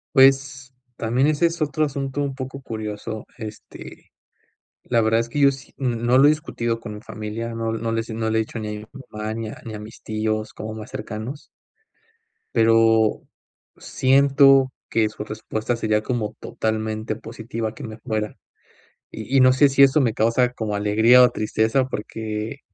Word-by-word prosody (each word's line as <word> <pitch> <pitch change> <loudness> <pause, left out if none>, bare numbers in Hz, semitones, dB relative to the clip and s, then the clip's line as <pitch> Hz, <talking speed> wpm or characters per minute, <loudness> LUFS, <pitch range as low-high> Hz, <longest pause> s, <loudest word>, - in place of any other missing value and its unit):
Pues, 135 0 +4 0.2
también 120 +4 +1
ese 155 +2 +3
es 170 0 -5
otro 155 +1 0
asunto 140 0 -3
un 140 -2 -2
poco 130 +1 -6
curioso, 110 -2 -6
este, 110 -1 -10 0.7
la 120 -2 +1
verdad 110 +1 +3
es 115 - -3
que 145 +5 -3
yo 140 -1 +6
sí 135 0 -13
n 125 -3 -1
no 120 +2 +2
lo 135 - +6
he 145 - +8
discutido 120 -7 -2
con 115 -2 -7
mi 105 - -10
familia, 110 +2 -5
no 115 0 -2
no 115 0 -2
le 115 0 0
no 110 0 -1
le 110 - +1
he - - +3
dicho 110 +1 -5
ni 110 -1 -4
a 105 0 -5
mi - - -10 0.3
mamá, 110 0 -4
ni 115 -1 -4
a - - -10
ni 110 - -6
a - - -5
mis 105 +2 -11
tíos 110 0 -2
como 110 +1 -6
más 110 0 -8
cercanos. 110 +7 -6 1.1
Pero, 115 -1 +3 0.5
siento 135 0 +4 0.2
que 110 -1 +2
su 105 - -7
respuesta 110 +2 -3
sería 110 -2 0
como 110 -3 -2
totalmente 110 0 -3
positiva 115 0 -5
que - - -10
me 110 -1 -7
fuera, 110 -3 -3 0.7
y 110 +5 -5
y - - +6
no 130 0 +7
sé, 130 +3 +5
si 140 0 +5
eso 140 +3 +5
me 120 -5 +2
causa 115 +3 +2
como 110 -4 -3
alegría 110 +4 +5
o 125 - +7
tristeza 110 +4 +1
porque 110 +2 -5
115 Hz, 180 wpm, -22 LUFS, 110-130 Hz, 1.1 s, he